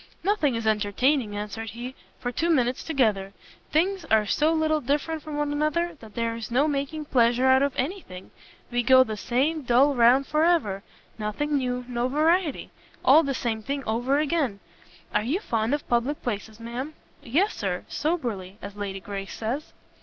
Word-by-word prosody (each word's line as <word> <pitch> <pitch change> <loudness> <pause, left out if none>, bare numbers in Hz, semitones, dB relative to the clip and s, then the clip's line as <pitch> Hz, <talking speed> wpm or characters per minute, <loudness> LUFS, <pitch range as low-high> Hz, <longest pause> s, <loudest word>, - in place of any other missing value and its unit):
"Nothing 345 - +2
is 230 -1 -3
entertaining," 220 +3 +1
answered 215 +2 -5
he, 240 +5 -7 0.3
"for 245 - -3
two 325 +7 -1
minutes 255 -6 +1
together. 215 -10 0 0.4
Things 365 +4 +1
are 220 -6 +3
so 305 +9 +2
little 315 -1 +1
different 295 +4 -1
one 305 -1 -6
from 295 0 0
another, 305 +3 0
that 220 -2 -14
there 230 -1 -1
is 230 -1 -6
no 265 +6 +3
making 295 +1 -2
pleasure 245 -1 +3
out 260 0 +5
of 280 -1 0
any 355 +10 -2
thing. 185 - -11 0.4
We 245 0 +1
go 260 +1 +7
the 220 -4 -5
same 270 +10 0
dull 265 +3 +4
round 250 +2 +5
for 305 +2 +1
ever; 265 - +2 0.4
nothing 215 +8 -2
new, 250 -2 -1
no 245 0 -1
variety! 315 +3 +1 0.3
all 315 - +8
the 275 -3 -2
same 225 -3 -2
thing 275 +5 -3
over 245 +5 +1
again! 290 -8 0 0.5
Are 210 - +3
you 270 - -1
fond 225 - -1
of 290 - -7
public 245 +5 0
places, 220 -1 -4
ma'am?" 245 +6 -5 0.3
"Yes, 345 - +1
Sir, 180 -3 -3
soberly, 235 - -2
as 200 -1 -8
Lady 200 -1 -4
Grace 195 +1 -6
says." 245 +7 -4
255 Hz, 175 wpm, -26 LUFS, 225-300 Hz, 0.5 s, all